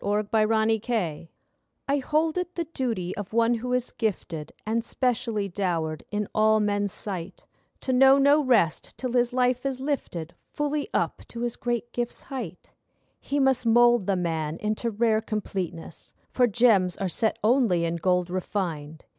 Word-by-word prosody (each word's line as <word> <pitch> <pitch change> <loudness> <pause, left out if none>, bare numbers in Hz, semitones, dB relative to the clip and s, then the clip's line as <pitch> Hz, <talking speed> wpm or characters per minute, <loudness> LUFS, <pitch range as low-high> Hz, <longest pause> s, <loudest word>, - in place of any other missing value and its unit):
NOBLESSE 210 +1 0 0.5
OBLIGE 190 -9 -2 0.6
I 280 +1 +2
hold 310 +4 0
it 360 0 -5
the 340 - -1
duty 240 - -3
of 205 0 -6
one 230 +1 +3
who 245 +2 -3
is 250 -1 -1
gifted 170 -8 -3
And 225 +2 0
specially 230 -4 -1
dowered 170 -5 -2
in 210 -1 -2
all 215 0 +4
men's 205 -1 0
sight, 185 -3 -5 0.4
To 260 - -1
know 270 +2 +7
no 285 +2 +5
rest 220 - +1
till 255 -2 -3
his 245 0 +2
life 250 0 +1
is 270 -2 -2
lifted 220 - -3 0.2
Fully 295 +4 -1
up - - -1
to 235 - -8
his 240 -1 -2
great 240 0 -3
gifts' 240 -1 -3
height. 235 - -7 0.5
He 285 - -2
must 265 -3 +2
mould 240 -2 +5
the 200 - +2
man 165 -3 -2
into 215 +3 -2
rare 220 0 +2
completeness, 190 -6 -5 0.2
For 250 -1 +3
gems 205 -5 +3
are 195 - -1
set 220 +5 0
only 215 -8 +3
in 170 0 -1
gold 180 0 +1
refined. 165 -5 -4
220 Hz, 160 wpm, -26 LUFS, 185-250 Hz, 0.6 s, know